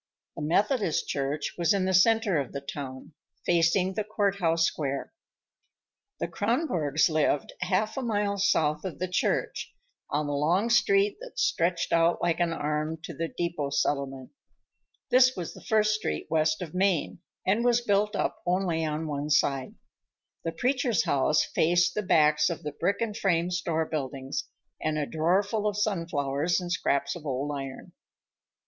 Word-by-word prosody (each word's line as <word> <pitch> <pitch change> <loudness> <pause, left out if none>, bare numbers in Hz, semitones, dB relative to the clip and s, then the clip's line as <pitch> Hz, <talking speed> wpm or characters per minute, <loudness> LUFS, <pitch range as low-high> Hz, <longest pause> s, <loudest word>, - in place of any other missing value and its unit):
The - - -6
Methodist 195 - +1
Church 140 +2 -2
was 170 +3 +3
in 190 -2 +1
the 190 - 0
center 205 -2 +4
of 135 - -4
the 140 - -3
town, 140 0 -7 0.3
facing 175 +2 +2
the 215 +2 -1
court 205 -2 0
house 165 -3 +2
square. 140 -4 -3 1.1
The - - -1
Kronborgs 195 - +1
lived 155 -3 0
half 190 +6 0
a - - 0
mile 205 -4 -1
south 155 -5 +2
of 185 - -5
the 185 - -2
church, 180 - -1 0.4
on 150 +1 0
the 145 - -2
long 175 +11 +1
street 200 -3 +3
that - - -11
stretched 170 - +1
out 165 +1 +3
like 175 -1 0
an 170 -1 +1
arm 155 0 -2
to 165 - -6
the 165 +3 -3
depot 170 -4 -3
settlement. 140 -2 -1 0.8
This 255 0 +6
was 175 -3 -5
the - - -13
first 215 -1 +2
street 215 0 -2
west 155 +1 +1
of 160 - -9
Main, 185 -3 +1 0.3
and 210 +5 +2
was 240 -1 +3
built 210 -1 +1
up - - -2
only 175 -2 0
on 155 +1 -2
one 145 -1 -3
side. 135 -3 +1 0.7
The 165 - -2
preacher's 245 - +1
house 145 +3 +2
faced 175 +1 +2
the 210 - -1
backs 155 -5 +3
of 170 - -5
the 150 - -3
brick 180 +9 -1
and 220 -3 -1
frame 175 -4 +1
store 165 -2 -1
buildings 135 -3 -4 0.4
and 155 0 -1
a 150 - 0
draw 170 +6 +2
full 210 +1 -2
of 205 -1 -1
sunflowers 165 -6 0
and 175 -1 -5
scraps 140 -5 0
of 170 - -9
old 140 0 -2
iron. 135 -1 -7
170 Hz, 165 wpm, -27 LUFS, 150-200 Hz, 1.1 s, This